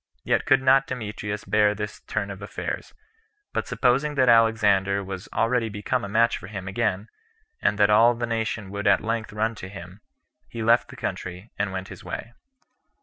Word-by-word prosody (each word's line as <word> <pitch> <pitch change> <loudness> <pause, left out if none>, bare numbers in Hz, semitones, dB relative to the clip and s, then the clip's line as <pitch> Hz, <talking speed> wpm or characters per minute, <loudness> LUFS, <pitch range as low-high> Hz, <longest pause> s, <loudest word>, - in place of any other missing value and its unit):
Yet - - +1
could 135 0 +4
not 135 +1 +5
Demetrius 105 -4 -5
bear 105 -1 +3
this 105 0 -5
turn 100 -1 -2
of 100 0 -9
affairs; 100 - -5 0.6
but - - -2
supposing 135 +4 +1
that 130 -2 +4
Alexander 105 -4 +4
was 95 -1 -7
already 115 -1 +1
become 105 +4 -2
a 100 - -4
match 115 +3 +2
for 90 - -10
him 95 -2 -7
again, 100 0 -1 0.5
and 105 - +2
that 105 0 +4
all 115 +3 +6
the 120 +1 -2
nation 110 -3 -3
would 100 +1 -3
[at - - +5
length] 115 0 -2
run 110 +2 0
to 95 -4 -9
him, 95 +1 -10 0.5
he 115 -1 -5
left 115 +2 +4
the - - -12
country, 90 +4 -5
and 105 -1 0
went 95 0 -5
his - - -10
way. 115 - -6
105 Hz, 185 wpm, -25 LUFS, 100-115 Hz, 0.6 s, all